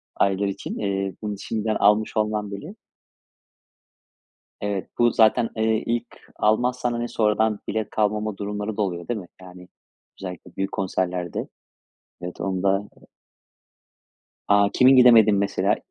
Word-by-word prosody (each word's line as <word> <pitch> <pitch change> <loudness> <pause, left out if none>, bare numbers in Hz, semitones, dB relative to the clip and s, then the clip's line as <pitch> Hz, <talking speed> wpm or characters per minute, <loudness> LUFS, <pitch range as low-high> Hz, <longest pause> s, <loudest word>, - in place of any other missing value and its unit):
aylar 100 +1 +1
için. 100 0 -5
İii, 95 -2 -2
bunu 105 -1 -3
şimdiden 110 0 -2
almış 105 +2 +2
olman 105 -1 -1
bile 150 - -8 1.9
Evet, 100 -2 -3
bu 120 0 +4
zaten, 115 +1 +3
eee, 110 0 +1
ilk 115 0 -1 0.3
almazsan, 120 +3 +1
hani, 120 0 -3
sonradan 110 -1 +1
bilet 110 0 -2
kalmama 105 0 -1
durumları 105 +1 -4
da 105 - 0
oluyor, 85 -3 -4
değil 120 -3 -2
mi? 90 - -11
Yani, 90 0 -13 0.5
özellikle 90 -3 -8
büyük 95 0 -2
konserlerde, 90 -2 -2 0.7
evet, 90 0 -7
onu 95 0 -2
da 100 +1 +1 1.6
A, 100 0 +4
kimin 130 +1 +6
gidemedin 115 -4 +7
mesela? 100 +1 +1
105 Hz, 130 wpm, -23 LUFS, 95-110 Hz, 1.9 s, gidemedin